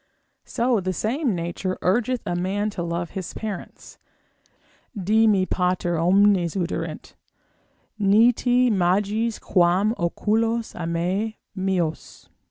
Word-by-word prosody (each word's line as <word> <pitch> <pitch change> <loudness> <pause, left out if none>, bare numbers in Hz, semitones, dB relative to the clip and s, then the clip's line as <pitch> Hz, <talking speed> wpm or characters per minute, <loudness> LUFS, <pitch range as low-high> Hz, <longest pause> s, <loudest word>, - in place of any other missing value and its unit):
So 240 -2 0
the 185 0 -2
same 235 - -1
nature 175 +2 -3
urgeth 240 +6 +1
a 175 - -2
man 200 +4 -1
to 190 - -5
love 170 0 -3
his 190 -2 -6
parents, 210 -4 -7 1.0
(dii 215 +4 +3
me 195 -3 +3
pater 180 -2 0
omnes 185 0 +3
oderint, 180 -2 -4 0.9
ni 210 +4 +5
te 245 +1 +2
magis 205 +4 +1
quam 185 +4 +2
oculos 225 +6 0
amem 175 +6 -2 0.2
meos!) 185 -4 -3
195 Hz, 110 wpm, -23 LUFS, 175-220 Hz, 1.0 s, ni